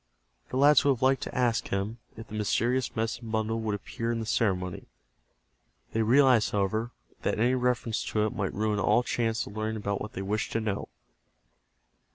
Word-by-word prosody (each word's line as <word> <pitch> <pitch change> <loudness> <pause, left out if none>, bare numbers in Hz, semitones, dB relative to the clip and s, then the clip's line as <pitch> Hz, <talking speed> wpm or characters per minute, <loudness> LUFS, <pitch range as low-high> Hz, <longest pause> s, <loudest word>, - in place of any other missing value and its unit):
The - - -3
lads 145 +3 +6
would 140 -2 +4
have 130 0 -6
liked 135 0 +3
to - - -7
ask 120 -2 +1
him 100 +4 -2 0.2
if 115 - -8
the - - -12
mysterious 120 +4 0
medicine 115 +1 -2
bundle 110 0 -1
would 110 -2 -1
appear 115 +3 -4
in 115 - -1
the 110 - -3
ceremony. 90 -5 -1 1.1
They 115 - +1
realized, 125 0 +5
however, 105 +3 0 0.3
that - - -1
any 120 +3 +3
reference 125 -3 0
to 105 -1 0
it 110 - -2
might 100 -5 -1
ruin 105 0 0
all 120 +4 +3
chance 115 -1 -1
of 100 - -10
learning 110 0 -3
what 100 +1 -3
they 95 - -4
wished 105 +2 -2
to 115 - +1
know. 105 -3 -3
110 Hz, 185 wpm, -28 LUFS, 105-120 Hz, 1.1 s, lads